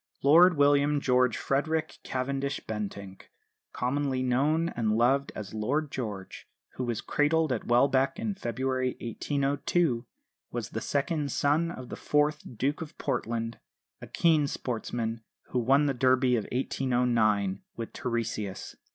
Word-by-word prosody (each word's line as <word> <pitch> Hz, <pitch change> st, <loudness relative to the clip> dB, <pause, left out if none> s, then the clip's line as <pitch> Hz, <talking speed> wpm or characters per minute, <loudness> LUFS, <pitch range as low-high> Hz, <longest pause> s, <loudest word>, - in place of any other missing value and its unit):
Lord 165 Hz, +4 st, +7 dB
William 145 Hz, +1 st, +4 dB
George 125 Hz, -2 st, +2 dB
Frederick 155 Hz, +3 st, -1 dB
Cavendish 135 Hz, +1 st, -2 dB
Bentinck, 100 Hz, -3 st, -6 dB, 0.4 s
commonly 130 Hz, 0 st, -1 dB
known 150 Hz, +7 st, +2 dB
and 110 Hz, -7 st, 0 dB
loved 135 Hz, +4 st, +2 dB
as 105 Hz, -1 st, -7 dB
"Lord 140 Hz, +8 st, -1 dB
George," 105 Hz, -7 st, -6 dB, 0.2 s
who 130 Hz, -, -5 dB
was 120 Hz, -2 st, -2 dB
cradled 155 Hz, 0 st, +1 dB
at 120 Hz, -, -2 dB
Welbeck 130 Hz, +4 st, +3 dB
in 220 Hz, -1 st, -2 dB
February 130 Hz, -5 st, -2 dB
1802, 140 Hz, +2 st, 0 dB, 0.4 s
was -, -, -4 dB
the -, -, -3 dB
second 145 Hz, 0 st, -1 dB
son 150 Hz, +6 st, +2 dB
of 130 Hz, -7 st, -8 dB
the -, -, -5 dB
fourth 150 Hz, +1 st, +1 dB, 0.2 s
Duke 140 Hz, +7 st, 0 dB
of 160 Hz, 0 st, -8 dB
Portland, 115 Hz, -1 st, -2 dB, 0.4 s
a -, -, -8 dB
keen 155 Hz, -4 st, +3 dB
sportsman 115 Hz, -3 st, -3 dB, 0.3 s
who 125 Hz, -, 0 dB
won 135 Hz, +5 st, +4 dB
the 140 Hz, -, +1 dB
Derby 130 Hz, 0 st, +3 dB
of 110 Hz, -4 st, -1 dB
1809 120 Hz, -6 st, +1 dB
with 115 Hz, -1 st, -6 dB
Teresias. 110 Hz, -5 st, -3 dB
130 Hz, 135 wpm, -28 LUFS, 115-145 Hz, 0.4 s, Lord